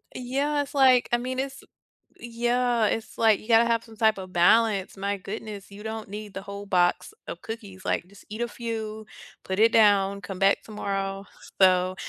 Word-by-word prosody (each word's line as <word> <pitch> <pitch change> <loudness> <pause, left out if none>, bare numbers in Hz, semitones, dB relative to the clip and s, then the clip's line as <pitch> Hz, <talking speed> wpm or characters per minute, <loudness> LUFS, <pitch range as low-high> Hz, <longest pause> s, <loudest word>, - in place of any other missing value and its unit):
Yeah, 280 +4 -1
it's 285 - -7
like, 260 -3 +5
I 240 - +4
mean, 255 +2 -4
it's 270 0 -5 0.6
yeah, 240 0 0
it's 225 +1 -3
like, 220 -2 +4
you 215 - -15
gotta 230 0 +5
have 230 -1 +1
some 225 -2 -15
type 220 -2 +3
of 185 -1 -8
balance, 200 +3 +3
my 200 +1 -2
goodness, 200 0 -8
you 205 +1 -11
don't 220 -1 -5
need 210 0 -8
the 195 - -6
whole 200 0 -8
box 180 - +1 0.2
of - - -7
cookies, 205 -4 -8
like, 175 - -1
just 200 +1 -17
eat 215 +2 -7
a 240 - 0
few, 220 -1 -6 0.4
put 190 +2 -3
it 225 +1 +5
down, 200 -2 +4
come 195 -2 -7
back 195 +1 +3
tomorrow, 195 -2 -4 0.3
so 185 0 +4
215 Hz, 190 wpm, -26 LUFS, 195-235 Hz, 0.6 s, like